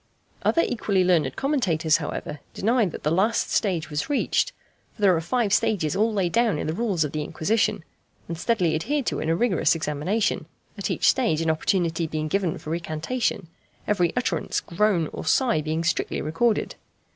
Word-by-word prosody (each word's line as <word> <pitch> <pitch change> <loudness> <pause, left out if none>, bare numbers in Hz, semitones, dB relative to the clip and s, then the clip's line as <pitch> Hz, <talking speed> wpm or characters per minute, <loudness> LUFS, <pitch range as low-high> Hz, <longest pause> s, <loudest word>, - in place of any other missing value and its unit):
Other 335 - +3
equally 200 -5 +1
learned 175 -3 +2
commentators, 180 - +1
however, 150 - -5 0.2
deny 230 +1 +2
that 165 - -7
the 150 - +1
last 200 +7 +1
stage 175 -7 0
was 150 - -2
reached. 290 - +1 0.4
For - - -14
there 190 -3 +6
are 165 - -1
five 215 +3 0
stages 160 -10 +1
all 220 +3 +2
laid 190 -5 0
down 230 -7 +2
in - - -3
the 155 - -1
rules 195 -4 0
of 150 - -3
the 155 - -2
Inquisition, 210 +5 0 0.4
and 170 - -4
steadily 180 -2 +1
adhered 270 - -1
to - - -1
in 155 - -2
a 165 - +3
rigorous 195 -4 +2
examination, 165 +8 -1 0.3
at - - -3
each - - +1
stage 230 - +3
an 165 -1 +2
opportunity 165 0 0
being 155 0 -3
given 185 -2 0
for 155 - -7
recantation, 170 +6 -2 0.4
every 180 -5 +2
utterance, 250 - 0
groan, 175 -3 +1
or - - -5
sigh 165 - +2
being 160 +2 -2
strictly 170 - -1
recorded. 210 +9 0
180 Hz, 180 wpm, -24 LUFS, 160-220 Hz, 0.4 s, there